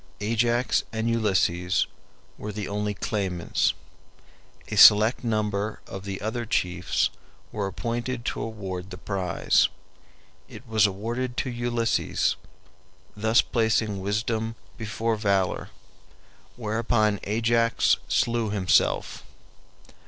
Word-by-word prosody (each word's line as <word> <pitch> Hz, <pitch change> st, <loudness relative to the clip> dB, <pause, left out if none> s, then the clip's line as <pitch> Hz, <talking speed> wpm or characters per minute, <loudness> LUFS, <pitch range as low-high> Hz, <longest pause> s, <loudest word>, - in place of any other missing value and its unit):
Ajax 120 Hz, +3 st, +1 dB
and 110 Hz, 0 st, -2 dB
Ulysses 95 Hz, -6 st, +1 dB, 0.5 s
were 105 Hz, -, -6 dB
the 105 Hz, -1 st, -5 dB
only 105 Hz, 0 st, -2 dB
claimants; 95 Hz, -5 st, -1 dB, 0.9 s
a -, -, -3 dB
select 110 Hz, +4 st, +7 dB
number 105 Hz, -2 st, -1 dB
of 95 Hz, 0 st, -8 dB
the 100 Hz, -1 st, -4 dB
other 110 Hz, +3 st, -2 dB
chiefs 90 Hz, -5 st, 0 dB, 0.4 s
were 105 Hz, -2 st, -2 dB
appointed 120 Hz, +4 st, -3 dB
to -, -, -2 dB
award 95 Hz, -4 st, -5 dB
the 90 Hz, -, -8 dB
prize. 95 Hz, -3 st, +1 dB, 0.8 s
It 125 Hz, -, -12 dB
was 110 Hz, -2 st, +4 dB
awarded 120 Hz, +6 st, -4 dB
to 130 Hz, -, -3 dB
Ulysses, 120 Hz, -7 st, 0 dB, 0.8 s
thus 110 Hz, +3 st, +3 dB
placing 110 Hz, -3 st, 0 dB
wisdom 110 Hz, +3 st, -1 dB, 0.2 s
before 115 Hz, 0 st, -2 dB
valor; 100 Hz, -3 st, 0 dB, 0.9 s
whereupon 110 Hz, -2 st, 0 dB
Ajax 115 Hz, +2 st, +2 dB
slew 115 Hz, -2 st, +1 dB
himself. 100 Hz, -3 st, +1 dB
110 Hz, 100 wpm, -26 LUFS, 100-115 Hz, 0.9 s, select